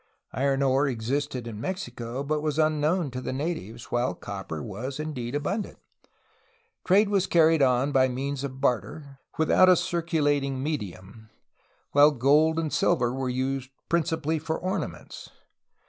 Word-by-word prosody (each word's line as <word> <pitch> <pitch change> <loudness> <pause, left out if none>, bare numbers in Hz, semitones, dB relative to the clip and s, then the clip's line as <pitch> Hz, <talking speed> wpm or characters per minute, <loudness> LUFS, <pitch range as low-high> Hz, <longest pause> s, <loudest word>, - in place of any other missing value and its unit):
Iron 135 +1 +1
ore 135 +2 +3
existed 130 +1 -2
in 110 -2 -7
Mexico, 125 - -4
but 150 +1 -1
was 150 -1 -2
unknown 155 0 +1
to 130 +1 -5
the - - -4
na 150 +7 -1
tives, 115 - -10
while 120 +1 0
copper 95 -6 -6
was 130 +8 -6
indeed 140 -5 -4
abundant. 195 +9 -3 1.1
Trade 200 +3 +4
was 200 -2 +1
carried 165 -2 +4
on 130 +1 +3
by 130 -1 +4
means 135 +2 -3
of 130 -1 -5
barter, 135 - -2 0.2
without 175 +4 +5
a 185 - +7
circulating 150 -6 0
medium, 110 - -6 0.6
while 145 +1 +7
gold 150 +4 +3
and 160 -2 -1
silver 120 -1 +2
were 130 -1 -2
used 130 +1 -2 0.2
principally 160 -1 0
for 160 +1 -3
ornaments. 185 +2 -5
140 Hz, 145 wpm, -26 LUFS, 125-155 Hz, 1.1 s, a